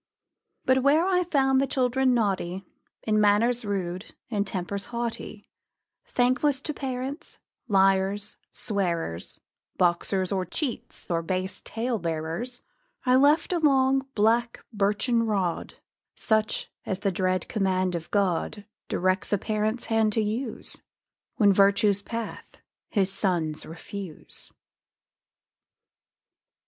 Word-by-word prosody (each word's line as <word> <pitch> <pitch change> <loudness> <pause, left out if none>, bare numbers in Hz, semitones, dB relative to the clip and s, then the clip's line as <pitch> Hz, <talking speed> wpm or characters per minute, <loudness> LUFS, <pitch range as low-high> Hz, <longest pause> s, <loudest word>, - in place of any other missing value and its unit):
But 260 0 +4
where 295 +6 +4
I 360 -1 +2
found 270 -5 +3
the 275 - +1
children 255 0 +2
naughty, 195 -4 -1 0.4
In 215 -1 +2
manners 230 +4 +3
rude, 190 -2 -4
in 205 -3 0
temper 195 0 -3
haughty, 235 -1 -5 0.6
Thankless 255 +3 +2
to 305 - -2
parents, 270 +4 -5 0.3
liars, 195 0 +2 0.2
swearers, 170 - -2 0.4
Boxers, 180 +2 +1
or 190 -2 0
cheats, 245 - -4
or 165 -1 +1
base 185 +3 -2
tale 230 0 -2
bearers, 165 +10 -3 0.4
I 250 0 +5
left 290 +6 +4
a 345 - +1
long, 270 -3 +3
black, 230 +3 +2
birchen 210 +4 +1
rod, 195 -6 -1 0.4
Such 220 0 0
as 190 0 -3
the 195 - +1
dread 185 0 0
command 185 -3 0
of 170 -1 -4
God 200 +1 0 0.2
Directs 185 +2 0
a 205 - +3
Parent's 215 +3 -1
hand 220 -1 +2
to 220 - +2
use 225 +3 -3 0.5
When 205 -6 +5
virtue's 200 +1 +4
path 230 +2 -6 0.3
his 195 -2 +1
sons 170 -6 0
refuse. 175 +1 -8
210 Hz, 115 wpm, -26 LUFS, 190-245 Hz, 0.6 s, I